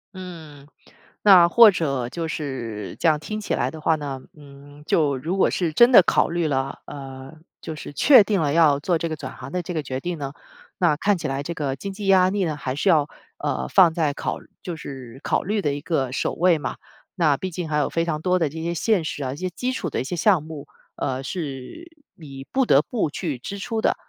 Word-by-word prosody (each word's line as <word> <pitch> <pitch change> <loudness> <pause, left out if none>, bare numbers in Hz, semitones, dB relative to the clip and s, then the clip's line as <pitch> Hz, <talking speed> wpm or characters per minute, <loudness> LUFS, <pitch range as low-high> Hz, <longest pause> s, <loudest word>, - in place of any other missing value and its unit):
嗯， 160 -6 -10 0.5
那 185 -4 +7
或 230 +5 +8
者， 140 -10 -1
就 165 +4 -4
是， 120 -10 -5
这 - - +2
样 155 -2 +3
听 215 +7 -5
起 210 - -3
来 125 - 0
的 160 - -9
话 160 +1 +2
呢， 140 -3 -5
嗯， 145 0 -15
就 145 -4 +2
如 165 +9 -3
果 - - +3
是 170 -3 -1
真 240 +11 +6
的 235 - +9
考 - - +2
虑 170 -1 0
了， 135 -2 -2
呃， 135 -1 -9 0.3
就 160 - -6
是 150 - -9
确 240 - +7
定 200 -2 0
了 145 -2 +1
要 150 -3 +4
做 170 +3 0
这 165 - -3
个 160 - -3
转 - - -8
行 - - -9
的 180 - -2
这 175 +1 -6
个 155 - -1
决 130 -1 -4
定 175 +4 -4
呢， 140 -2 -5 0.5
那 170 -5 +3
看 205 +7 +1
起 160 - -3
来 135 +1 -3
这 170 - -4
个 145 -5 -3
经 195 +9 -6
济 200 0 -6
压 185 -1 +5
力 200 -1 0
呢 160 -4 -1
还 130 -3 -4
是 170 +7 +1
要， 155 -5 +4 0.3
呃， 65 - -2
放 165 - +5
在 155 -4 0
考， - - -3 0.2
就 175 -3 -5
是 135 -5 -9
考 - - 0
虑 205 +2 -1
的 145 -5 -1
一 145 - -6
个 140 -6 -1
首 130 - -1
位 175 0 +3
嘛。 135 -5 -5 0.4
那 155 -6 +2
毕 185 +4 -5
竟 170 -1 -5
还 150 - 0
有 150 - +1
非 165 - 0
常 165 -2 -2
多 180 0 +2
的 160 -4 +1
这 160 +3 -7
些 170 +1 -2
现 195 +1 +1
实 150 - -4
啊， 130 - -3
这 130 - -4
些 185 +5 -3
基 250 +8 -2
础 195 - -4
的 - - -1
一 - - -3
些 140 - -4
项 180 -1 +3
目。 155 -2 -9 0.3
呃， 130 -1 -2
是， 145 - -6 0.3
你 135 -4 -10
不 265 0 +2
得 140 - +5
不 205 -1 -2
去 155 -6 -3
支 195 +11 -7
出 225 +2 -3
的， - - +2
160 Hz, 255 characters per minute, -23 LUFS, 140-180 Hz, 0.5 s, 的